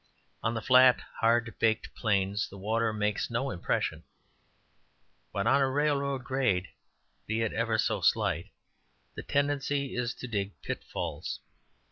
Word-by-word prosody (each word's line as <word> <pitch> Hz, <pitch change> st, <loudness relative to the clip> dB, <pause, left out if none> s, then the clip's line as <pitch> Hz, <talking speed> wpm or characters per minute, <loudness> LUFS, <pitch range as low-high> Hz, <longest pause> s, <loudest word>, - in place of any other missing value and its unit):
On 115 Hz, +1 st, 0 dB
the 110 Hz, -, -3 dB
flat, 130 Hz, -1 st, +7 dB, 0.2 s
hard 115 Hz, 0 st, +2 dB
baked 110 Hz, -1 st, +1 dB
plains, 100 Hz, -1 st, 0 dB
the 100 Hz, -, -11 dB
water 110 Hz, +3 st, 0 dB
makes 105 Hz, -1 st, -1 dB
no 125 Hz, +3 st, -1 dB
impression, 85 Hz, -, -1 dB, 1.3 s
but 100 Hz, +2 st, -1 dB
on 135 Hz, +4 st, +4 dB
a 135 Hz, -, +3 dB
railroad 140 Hz, -1 st, 0 dB
grade, 125 Hz, -8 st, 0 dB, 0.6 s
be 110 Hz, +1 st, 0 dB
it 115 Hz, -, -1 dB
ever 115 Hz, -1 st, +1 dB
so -, -, 0 dB
slight, -, -, +2 dB, 0.7 s
the -, -, -6 dB
tendency 140 Hz, -1 st, 0 dB
is 120 Hz, 0 st, -1 dB
to 125 Hz, -, -7 dB
dig 100 Hz, -4 st, -3 dB
pitfalls. -, -, -4 dB
115 Hz, 135 wpm, -29 LUFS, 110-135 Hz, 1.3 s, flat